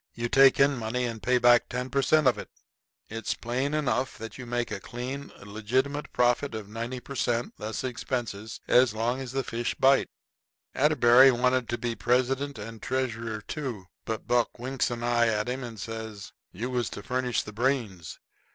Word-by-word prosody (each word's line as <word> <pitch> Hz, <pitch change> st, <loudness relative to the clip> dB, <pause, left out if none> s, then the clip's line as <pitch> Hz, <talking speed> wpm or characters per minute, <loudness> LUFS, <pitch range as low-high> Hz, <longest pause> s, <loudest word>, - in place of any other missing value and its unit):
You 120 Hz, 0 st, -2 dB
take 135 Hz, +1 st, +6 dB
in 140 Hz, -1 st, +4 dB
money 115 Hz, +3 st, -2 dB
and 115 Hz, -2 st, -5 dB
pay 125 Hz, 0 st, +3 dB
back 120 Hz, -1 st, +5 dB
ten 125 Hz, +1 st, -4 dB
per 140 Hz, -, +2 dB
cent. 155 Hz, +2 st, +3 dB
of 130 Hz, -, +3 dB
it; -, -, -8 dB, 0.6 s
it's 115 Hz, +1 st, -3 dB
plain 130 Hz, +5 st, -2 dB
enough 135 Hz, -3 st, 0 dB
that 110 Hz, -1 st, -8 dB
you 125 Hz, -2 st, -8 dB
make 120 Hz, -1 st, -2 dB
a 105 Hz, -, -3 dB
clean, 130 Hz, +6 st, -6 dB
legitimate 125 Hz, +8 st, -2 dB
profit 125 Hz, +1 st, +1 dB
of 110 Hz, -2 st, -6 dB
90 115 Hz, +4 st, -5 dB
per 140 Hz, -, -9 dB
cent., 120 Hz, -2 st, -1 dB
less 110 Hz, +3 st, -4 dB
expenses, 120 Hz, -4 st, -4 dB
as 125 Hz, -3 st, +4 dB
long 120 Hz, +4 st, 0 dB
as 130 Hz, -2 st, -6 dB
the 135 Hz, 0 st, -1 dB
fish 120 Hz, 0 st, -3 dB
bite. 135 Hz, +1 st, +4 dB, 0.6 s
Atterbury 130 Hz, -3 st, +6 dB
wanted 125 Hz, 0 st, +1 dB
to 120 Hz, -, -1 dB
be 120 Hz, -1 st, -2 dB
president 130 Hz, +3 st, 0 dB
and 110 Hz, +1 st, -8 dB
treasurer 115 Hz, -4 st, -2 dB
too, 120 Hz, -5 st, -5 dB, 0.2 s
but 110 Hz, -1 st, -4 dB
Buck 120 Hz, -1 st, +1 dB
winks 130 Hz, +2 st, -1 dB
an 120 Hz, -1 st, -4 dB
eye 120 Hz, -1 st, +3 dB
at 105 Hz, -1 st, 0 dB
him 125 Hz, +1 st, -3 dB
and 115 Hz, -3 st, -8 dB
says: 110 Hz, -2 st, -7 dB, 0.2 s
"You 120 Hz, +7 st, -4 dB
was 125 Hz, -2 st, -1 dB
to 105 Hz, -, -8 dB
furnish 125 Hz, 0 st, -1 dB
the 105 Hz, -, -9 dB
brains. 115 Hz, -, -1 dB
120 Hz, 185 wpm, -27 LUFS, 115-130 Hz, 0.6 s, take